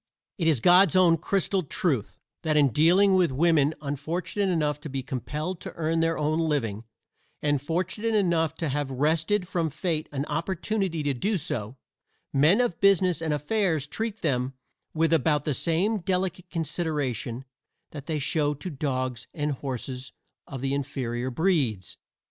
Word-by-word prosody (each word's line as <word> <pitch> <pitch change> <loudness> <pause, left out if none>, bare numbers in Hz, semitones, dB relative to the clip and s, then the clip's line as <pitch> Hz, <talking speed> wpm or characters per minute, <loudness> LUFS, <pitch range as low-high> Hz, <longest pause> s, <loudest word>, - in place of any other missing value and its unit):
It 165 - +1
is 150 -8 +3
God's 180 +2 +6
own 180 -3 +6
crystal 195 +3 0
truth 145 - -1 0.2
that 155 -2 +1
in 145 -2 +5
dealing 180 - +4
with 185 -2 +4
women 155 +1 +3
unfortunate 170 +7 -2
enough 150 -3 0
to 150 - -7
be 135 -1 -4
compelled 150 +8 -4
to - - -7
earn 165 0 0
their 165 0 +1
own 155 +2 0
living 120 -10 -1 0.6
and 145 -2 +1
fortunate 185 +9 -1
enough 170 -6 +2
to 160 -2 -2
have 145 0 -2
wrested 160 +8 +1
from 170 -3 -1
Fate 155 +1 -2
an 140 0 -2
opportunity 170 +2 -2
to 145 -1 +1
do 200 - 0
so, 120 - -4 0.6
men 155 - +5
of 235 -9 -1
business 185 -3 +4
and 160 -1 -1
affairs 160 0 0
treat 220 +6 -4
them 130 -3 0 0.4
with 165 0 +2
about 150 -2 +2
the 150 - 0
same 180 - +1
delicate 180 0 -2
consideration 145 - -2 0.5
that 145 -1 -9
they 160 -2 -1
show 145 +1 0
to 160 +6 -6
dogs 130 -4 -3
and 150 -2 -1
horses 130 -1 -5 0.3
of 135 -3 -7
the 135 0 -1
inferior 130 -3 -2
breeds. 130 - 0
155 Hz, 155 wpm, -26 LUFS, 140-175 Hz, 0.6 s, God's